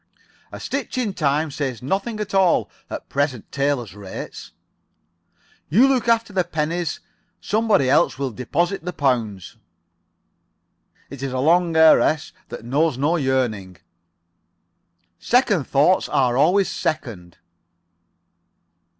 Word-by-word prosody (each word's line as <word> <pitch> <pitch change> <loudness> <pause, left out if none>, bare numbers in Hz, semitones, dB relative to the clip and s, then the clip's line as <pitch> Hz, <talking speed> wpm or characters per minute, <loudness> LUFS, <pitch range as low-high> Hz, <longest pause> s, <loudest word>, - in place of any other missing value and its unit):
"A - - -8
stitch 275 -1 -4
in 225 -6 -1
time 150 -1 0
saves 130 -5 -4
nothing 200 - -2
at 210 -2 -5
all 190 -3 +2 0.2
at - - -7
present 140 -5 -2
tailors' 135 -8 -1
rates." 100 -2 -9 1.2
"You 225 - +5
look 260 -3 +1
after 230 -2 +1
the 185 -1 +2
pennies. 165 0 -3 0.4
Somebody 215 - +1
else 145 +4 +3
will 135 -1 -3
deposit 165 - -2
the 180 +1 -5
pounds." 115 - -2 1.5
"It's 140 -2 -9
a 135 -1 -3
long 165 +4 +2
heiress 160 -1 +4 0.2
that - - -8
knows 140 +2 +1
no 150 +5 +1
yearning." 125 - -1 1.4
"Second 220 - +1
thoughts 150 +7 +2
are 125 -3 +1
always 185 +8 +3
second." 110 - -4
150 Hz, 115 wpm, -21 LUFS, 130-185 Hz, 1.5 s, You